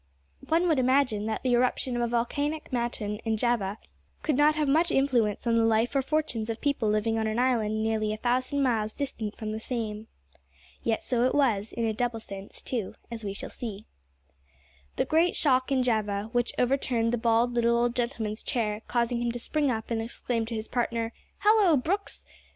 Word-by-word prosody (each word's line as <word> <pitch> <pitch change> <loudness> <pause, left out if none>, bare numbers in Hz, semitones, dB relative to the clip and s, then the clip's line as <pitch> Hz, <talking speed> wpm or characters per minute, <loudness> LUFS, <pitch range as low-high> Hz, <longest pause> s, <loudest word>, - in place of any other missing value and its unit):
One 335 +3 +3
would 315 -5 +3
imagine 255 -5 +2
that 220 - -3
the 255 -2 +2
eruption 250 +1 +1
of 240 - 0
a 235 - +1
volcanic 285 +6 -2
mountain 235 -4 -2
in 225 -1 -1
Java 215 -4 0 0.5
could 300 - +1
not 295 +2 +4
have 305 -1 0
much 320 +5 +3
influence 250 -8 +1
on 230 -1 +3
the 230 - +4
life 225 +3 +2
or 275 - +4
fortunes 265 -6 -1
of 225 - -3
people 280 -7 0
living 220 +1 +1
on 220 - 0
an 220 +1 -1
island 220 -4 +1
nearly 220 -1 0
a 215 - -3
thousand 255 +4 0
miles 220 -4 +1
distant 230 -7 -4
from 215 -1 -4
the 215 - -3
same. 220 -2 -4 0.7
Yet 225 -1 0
so 245 -2 +1
it 255 - +1
was, 225 -7 +2
in 230 - -2
a 220 - 0
double 235 0 -1
sense, 200 -2 -9
too, 230 -7 -3 0.2
as 230 -1 -6
we 200 -1 -3
shall - - -7
see. 215 -3 -6 1.1
The - - +1
great 330 +3 +2
shock 260 -3 +2
in 260 -2 +3
Java, 215 -3 0
which 240 0 0
overturned 245 -2 +1
the 240 - 0
bald 230 +1 +2
little 235 0 +3
old 240 0 +1
gentleman's 230 -3 -2
chair, 215 -3 -1
causing 240 0 0
him 240 0 0
to - - -3
spring 290 +4 0
up 225 -1 -3
and 225 -1 0
exclaim 230 0 -2
to 230 - -4
his 220 0 -4
partner, 235 -1 -1 0.3
"Hallo, 415 -7 +5
Brooks!" 385 +10 -2
235 Hz, 195 wpm, -28 LUFS, 220-260 Hz, 1.1 s, Hallo